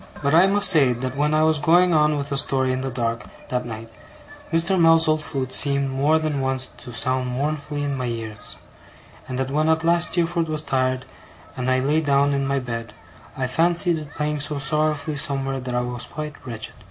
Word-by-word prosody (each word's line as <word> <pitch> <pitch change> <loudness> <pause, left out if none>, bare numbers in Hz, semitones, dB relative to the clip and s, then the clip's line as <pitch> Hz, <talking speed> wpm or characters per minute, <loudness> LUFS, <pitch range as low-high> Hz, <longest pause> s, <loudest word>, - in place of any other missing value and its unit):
But 140 +1 +1
I 175 +4 +6
must 205 +1 +5
say 135 -6 +5
that 130 +2 -5
when 150 +2 +1
I 155 - +3
was 160 -1 +3
going 175 +4 +4
on 150 -1 +3
with 140 0 -5
a - - 0
story 130 -1 0
in 130 - -2
the 135 - -3
dark 115 -3 -2 0.3
that 125 -1 -2
night, 115 0 -7 0.6
Mr. 170 +3 +2
Mell's 165 0 +5
old 155 0 +2
flute 135 -4 -4
seemed 140 -1 +1
more 145 +4 +2
than 155 -3 -2
once 130 -1 -1
to 125 - -10
sound 130 +2 0
mournfully 145 +2 -3
in 140 -1 -2
my 130 -2 -3
ears; 110 -3 -5 0.7
and 130 - -4
that 130 0 -2
when 155 +2 +1
at 160 0 +2
last 170 +1 +3
Steerforth 170 -1 0
was 155 0 -2
tired, 130 -2 -1 0.5
and 125 0 -2
I 130 0 +2
lay 150 +4 +1
down 140 -1 +2
in 140 -1 -1
my 140 0 0
bed, 115 -4 -5 0.4
I 130 - -1
fancied 170 +5 +2
it 150 -1 -11
playing 150 0 -2
so 145 +1 -2
sorrowfully 150 +1 -1
somewhere, 135 -2 0
that 125 -1 -5
I 125 - +1
was 125 0 -4
quite 150 -1 -6
wretched. 115 -3 -6
140 Hz, 210 wpm, -22 LUFS, 130-155 Hz, 0.7 s, I